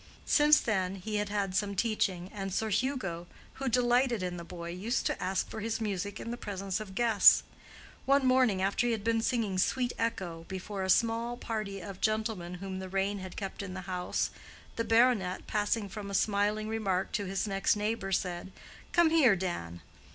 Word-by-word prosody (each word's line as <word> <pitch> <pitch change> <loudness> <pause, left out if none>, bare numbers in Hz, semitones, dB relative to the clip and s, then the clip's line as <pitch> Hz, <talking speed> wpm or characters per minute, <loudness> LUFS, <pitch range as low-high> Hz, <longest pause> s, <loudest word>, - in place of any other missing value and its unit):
Since 300 0 +6
then 190 -4 0
he 210 +3 -3
had 205 0 -1
had 200 -2 -1
some 200 +1 0
teaching, 190 -4 0
and 195 -2 -4
Sir 220 +3 -1
Hugo, 195 -8 -1 0.3
who 270 - 0
delighted 245 -2 +2
in 180 -1 -3
the 170 - -6
boy, 170 0 -7
used 210 +8 -2
to - - -1
ask 185 +1 0
for - - -7
his 225 +1 -2
music 205 -1 -3
in 230 - -5
the 240 - -4
presence 195 -2 -3
of 200 -3 -8
guests. 225 -4 +6 0.6
One 275 0 +4
morning 255 -7 +3
after 200 +5 +1
he 235 - +2
had 215 -3 -3
been 225 0 +2
singing 225 -6 0
"Sweet 245 +5 +1
Echo" 175 -8 -2
before 190 +1 -5
a 190 - -2
small 230 +4 +2
party 215 -5 -4
of 195 +1 -8
gentlemen 215 -5 -1
whom 190 +1 -5
the 190 0 -6
rain 195 +2 0
had 185 -1 -8
kept 195 -1 -5
in 190 -2 -6
the 185 - -5
house, 180 -1 -2 0.4
the 230 - -1
baronet, 225 -6 +3
passing 210 0 0
from 200 +1 -7
a 200 - -3
smiling 210 +1 +1
remark 195 -4 -1
to 205 - -1
his 195 +2 -2
next 195 0 +2
neighbor 210 -1 -2
said: 180 0 -2 0.4
"Come 345 -2 +5
here, 275 -11 +6
Dan!" 85 - -4
205 Hz, 190 wpm, -30 LUFS, 190-230 Hz, 0.6 s, Since